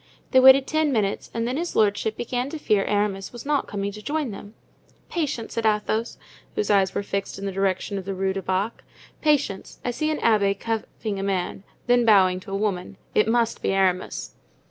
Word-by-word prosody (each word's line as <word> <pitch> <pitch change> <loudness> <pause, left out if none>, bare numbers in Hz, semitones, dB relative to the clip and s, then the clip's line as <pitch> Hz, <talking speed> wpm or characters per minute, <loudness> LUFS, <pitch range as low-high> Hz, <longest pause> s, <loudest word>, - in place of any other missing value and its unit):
They 260 - +6
waited 265 +1 +8
ten 310 -1 +1
minutes 210 -5 -1
and 230 0 -2
then 255 +3 -1
his 340 +2 -3
lordship 215 +1 +2
began 245 +2 -2
to 315 - -5
fear 210 -9 +2
Aramis 205 -2 -1
was 240 +1 -9
not 290 -1 +1
coming 200 0 -3
to 210 +1 -10
join 295 +1 -2
them. 205 +2 -10 0.5
"Patience," 285 -9 -2
said 230 - -2
Athos, 215 +2 0 0.4
whose 210 - 0
eyes 195 -2 +3
were - - -1
fixed 200 0 -3
in 195 - -6
the 195 - -2
direction 195 +1 -1
of 190 - -9
the 195 0 -3
Rue 190 0 0
du 195 - -3
Bac, 190 +4 -2 0.4
"patience; 290 -10 0
I 245 - +1
see 310 +6 -1
an 310 - 0
abbé 200 -3 +2
cuffing 220 -2 -3
a - - -3
man, 190 -1 -2 0.2
then 245 0 +4
bowing 190 -5 +5
to 190 - -11
a 195 - -1
woman; 195 -2 -2 0.2
it 215 - +3
must 230 0 +1
be - - 0
Aramis." 185 -1 0
210 Hz, 205 wpm, -24 LUFS, 195-245 Hz, 0.5 s, waited